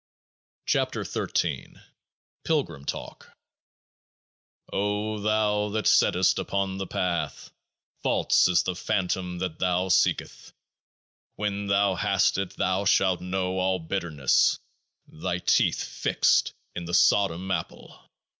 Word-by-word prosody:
21 - - 0
KEOAAH - - -8 0.6
ir - - -19 0.6
PILGRIM 85 - -1
TALK - - -6 1.4
O 105 +2 -1
thou 105 0 +1
that 110 +1 -2
settest - - +3
out - - 0
upon 95 -1 -2
The 95 - -4
Path, 90 -2 -3 0.5
false - - +3
is 90 -1 +3
the 90 - -2
Phantom 90 -1 -2
that 90 -2 -4
thou 90 0 0
seekest. - - 0 0.8
When 100 -1 -3
thou 100 0 +2
hast 95 - +1
it 95 0 -4
thou 95 +2 0
shalt 95 -2 +2
know 95 0 -2
all 95 0 +1
bitterness, 80 -5 +1 0.5
thy 85 +2 -4
teeth 90 - +2
fixed - - +1 0.2
in 90 - -5
the 85 +1 -1
Sodom 95 -1 +2
Apple. 85 -4 -6
95 Hz, 115 wpm, -26 LUFS, 90-100 Hz, 1.4 s, settest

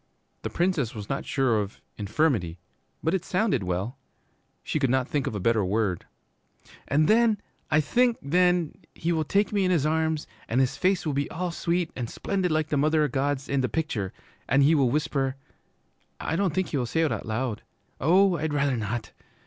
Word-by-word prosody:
"' - - -45
The - - -3
Princess 170 -10 0
was 105 -2 -7
not 135 - -2
sure 130 -5 +2
of 100 0 -7 0.2
'infirmity,' 105 - 0 0.5
but 160 - +1
it 190 - 0
sounded 185 - +1
well. 95 +8 -3 0.6
She 155 - -1
could 135 -3 +2
not 130 0 +1
think 145 -3 -1
of - - -3
a - - -2
better 110 +2 +2
word. 95 -2 -1 0.8
'And 150 +2 +3
then 220 -1 +4 0.3
I 155 0 +4
think 240 - +2
then 175 +2 +2 0.2
he 170 - -1
will 160 -2 +1
take 200 +7 +1
me 200 -2 +2
in 185 - +2
his 165 -6 +2
arms, 160 0 0 0.2
and 120 - +1
his 130 -1 +2
face 185 -1 +1
will 150 - 0
be 140 0 -1
all 180 +1 -3
sweet 170 0 -1
and 120 -3 -4
splendid 190 -2 -1
like 155 -1 0
the 150 - +1
Mother 155 +2 +3
o' - - +2
God's 140 0 -1
in 140 -1 +1
the 130 - 0
picture, 125 - -2 0.4
and 140 0 +5
he 150 +4 +5
will 140 -5 +3
whisper, 140 -2 0 0.8
I - - -2
don't 180 -3 0
think 190 -1 0
he 145 - -1
will 125 -2 -1
say 160 - 0
it 160 - +2
out - - -4
loud, 110 0 -2 0.4
oh, 180 +4 +4
I'd 155 -1 -2
rather 140 -3 +1
not! 110 +1 -3
145 Hz, 205 wpm, -26 LUFS, 125-170 Hz, 0.8 s, and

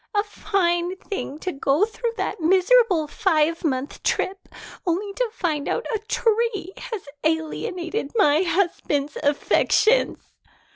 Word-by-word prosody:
"A 410 - +3
fine 365 -4 0
thing 380 -7 -5
to 370 - -2
go 275 +5 +2
through 460 +1 -4
that 380 -2 -3
miserable 375 +1 +4
five 325 0 +1
month 270 -3 -2
trip 385 +1 -1 0.3
only 385 +4 -1
to - - -1
find 320 -9 -2
out 475 - -1
a 440 - 0
tree 440 -3 0
has 445 -6 -6 0.2
alienated 330 +2 -2
my 310 -7 +4
husband's 335 -6 0
affections." 370 +10 +3
370 Hz, 125 wpm, -23 LUFS, 315-425 Hz, 0.3 s, miserable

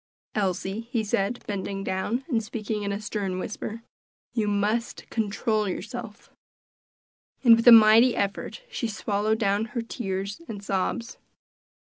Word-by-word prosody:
"Elsie," 200 +2 -2
he 230 -4 +1
said, 205 +3 -1
bending 195 -1 -3
down, 200 +8 -2
and 235 -8 0
speaking 215 -1 -4
in 200 0 -2
a 200 - -2
stern 205 -3 -3
whisper, 215 +4 -5 0.5
"you 220 -3 0
must 210 +3 -1
control 215 -1 0
yourself." 210 +3 -7 1.1
And 235 -3 +9
with 230 +1 -1
a - - +12
mighty 225 +2 +8
effort 200 - -3
she 235 - -3
swallowed 215 0 0
down 205 -1 +1
her - - +1
tears 200 - -4
and 205 -2 -7
sobs. 200 +4 -2
215 Hz, 135 wpm, -26 LUFS, 200-230 Hz, 1.1 s, a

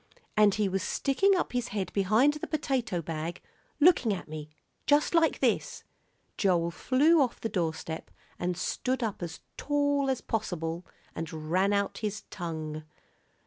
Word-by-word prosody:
"And 210 -2 +5
he 210 -2 +1
was 190 0 -1
sticking 385 - +2
up 355 - -1
his 245 -1 0
head 200 -2 -3
behind 215 +9 +4
the 300 - -5
potato 260 - -1
bag, 165 +2 -4 0.4
looking 295 -8 +5
at - - -8
me 155 -1 -7 0.4
just 295 +3 +4
like 330 -1 +4
this." - - 0 0.5
Joel 175 -4 +2
flew 285 - +4
off 255 -3 0
the 225 - -2
doorstep 160 -4 -3 0.3
and 175 0 -1
stood 260 +5 -1
up 215 -4 -3
as 165 -2 -6 0.2
tall 285 -1 +1
as 260 -2 0
possible 175 -6 -3 0.3
and 160 -1 -6
ran 190 +3 +3
out 200 -1 0
his 215 -1 -3
tongue. 155 -3 -5
200 Hz, 150 wpm, -29 LUFS, 170-265 Hz, 0.5 s, And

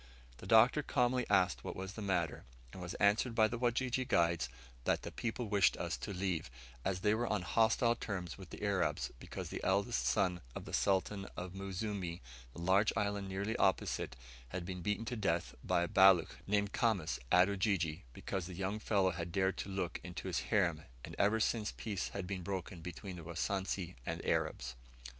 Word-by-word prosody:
The - - -10
Doctor - - +6
calmly 125 0 +1
asked 90 -2 +3
what - - -5
was 95 +1 -5
the 110 - -7
matter, 90 -6 0 0.3
and 95 - -8
was 90 0 -5
answered 105 +4 +3
by 110 -1 +5
the 120 +1 -4
Wajiji 125 +1 +1
guides 85 -5 +2 0.4
that - - +1
the - - -5
people 115 0 -3
wished 100 -2 +4
us 85 -2 -2
to 105 - -5
leave, 90 -6 -2 0.3
as 95 -1 -1
they 105 +2 +3
were 120 +2 0
on 105 -4 0
hostile 115 +4 +3
terms 90 - -4
with - - -11
the - - -8
Arabs, - - 0
because - - -6
the - - -5
eldest 100 +5 +1
son 90 -4 +2
of - - -6
the - - -9
Sultan 100 +1 +1
of 90 0 -5
Muzimu, 95 -2 -3 0.3
the 65 - -10
large 95 +5 +4
island 100 -1 -1
nearly 100 +4 -2
opposite, 95 -7 +1 0.3
had 90 +5 -4
been 90 0 -5
beaten 105 +5 -1
to 120 - -3
death 85 -6 0
by 85 - +2
a - - 0
Baluch, 95 -3 +6
named 100 0 +1
Khamis, 95 -9 +1
at 90 +1 +7
Ujiji, 95 -6 0
because 90 +7 -4
the 90 - -7
young 95 +3 -2
fellow 100 -3 +2
had 85 0 -4
dared 95 +1 +1
look 95 -4 -2
into - - -6
his - - 0
harem, 85 -7 +2 0.2
and - - -9
ever 105 +3 +4
since 110 -1 0
peace 105 -4 -2
had 100 -2 -5
been 95 0 -4
broken 90 -1 -4
between 90 +2 -7
the 85 - -8
Wasansi 90 +2 -2
and - - -4
Arabs. 65 0 0
95 Hz, 190 wpm, -35 LUFS, 90-105 Hz, 0.4 s, at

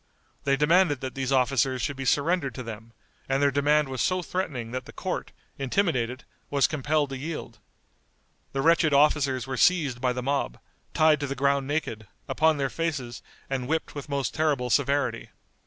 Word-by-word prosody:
They 140 0 +3
demanded 155 0 +3
that 130 -1 -4
these 135 -1 -3
officers 130 0 +2
should 145 - -2
be 135 0 -5
surrendered 145 -2 +1
to 130 - -5
them, 115 0 -8 0.4
and 135 0 +2
their 140 0 +3
demand 145 +2 +3
was 130 -1 -3
so 185 -1 +1
threatening 140 -12 -3
that 130 0 -4
the 145 - -11
court, 185 - -4 0.3
intimidated, 130 - 0 0.3
was 140 -1 +3
compelled 150 -1 0
to 135 - -4
yield. 140 -7 -6 0.9
The 135 0 -2
wretched 165 -2 +4
officers 140 -4 +3
were 130 0 -4
seized 145 -9 +3
by 125 -1 +1
the 125 0 -4
mob, 140 - -1 0.4
tied 155 -1 +5
to 145 - -2
the 135 - -3
ground 140 0 +1
naked, 115 -8 -3 0.2
upon 160 -1 +2
their 135 -1 -1
faces, 140 -8 -3 0.3
and 130 -2 -3
whipped 160 +2 -1
with 145 0 -7
most 140 -6 -1
terrible 145 -6 0
severity. 140 -3 +1
140 Hz, 175 wpm, -26 LUFS, 130-150 Hz, 0.9 s, tied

